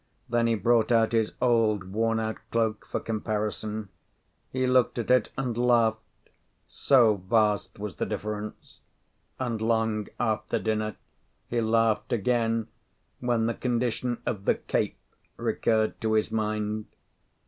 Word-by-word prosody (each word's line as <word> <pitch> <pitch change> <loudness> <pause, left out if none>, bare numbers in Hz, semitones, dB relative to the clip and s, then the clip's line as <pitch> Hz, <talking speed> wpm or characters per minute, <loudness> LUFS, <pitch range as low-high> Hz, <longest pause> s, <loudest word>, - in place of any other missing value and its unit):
Then 120 0 +2
he 115 - +2
brought 115 +3 +2
out 115 -1 +4
his 115 -2 +1
old, 110 -6 +2
worn 115 +1 +1
out 110 0 -2
cloak, 110 -2 -1
for - - -1
comparison. 110 -1 -3 0.6
He 130 0 0
looked 125 -1 +3
at 120 +1 -1
it 125 -3 +4
and 130 -4 -1
laughed, 115 -2 +1 0.3
so 115 -6 +4
vast 105 +2 +1
was 100 -6 -6
the - - -1
difference. 105 0 -5 0.6
And 120 -4 -2
long 110 -2 +1
after 110 -3 0
dinner 110 -2 -1 0.5
he 120 -1 0
laughed 115 -1 +2
again 115 0 +1 0.5
when 120 -2 +1
the 115 - +1
condition 120 0 -1
of 100 -3 -3
the - - +4
"cape" - - -2 0.4
recurred 110 -1 0
to 110 0 +1
his 110 -1 +1
mind. 105 -1 -2
110 Hz, 135 wpm, -27 LUFS, 110-120 Hz, 0.6 s, out